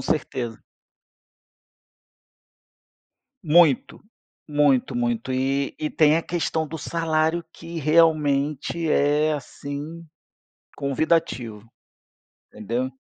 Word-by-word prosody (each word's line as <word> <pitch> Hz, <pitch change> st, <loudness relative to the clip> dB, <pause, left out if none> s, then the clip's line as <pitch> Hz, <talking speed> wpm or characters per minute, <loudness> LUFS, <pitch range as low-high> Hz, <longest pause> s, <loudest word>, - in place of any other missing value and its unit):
certeza. 120 Hz, -6 st, -3 dB, 2.8 s
Muito, 160 Hz, -4 st, +3 dB, 0.5 s
muito, 140 Hz, -4 st, +2 dB
muito 120 Hz, +1 st, -1 dB
e 135 Hz, +2 st, 0 dB
e 155 Hz, -, -2 dB
tem 155 Hz, 0 st, +4 dB
a 165 Hz, -, 0 dB
questão 160 Hz, -2 st, -2 dB
do 160 Hz, -, -6 dB
salário, 160 Hz, +1 st, 0 dB
que 165 Hz, 0 st, -8 dB
realmente 155 Hz, 0 st, +2 dB
é 150 Hz, +2 st, +2 dB
assim 145 Hz, +3 st, -6 dB, 0.7 s
convidativo, 130 Hz, -7 st, -1 dB, 0.8 s
entendeu? 120 Hz, +5 st, -3 dB
150 Hz, 80 wpm, -23 LUFS, 130-160 Hz, 2.8 s, tem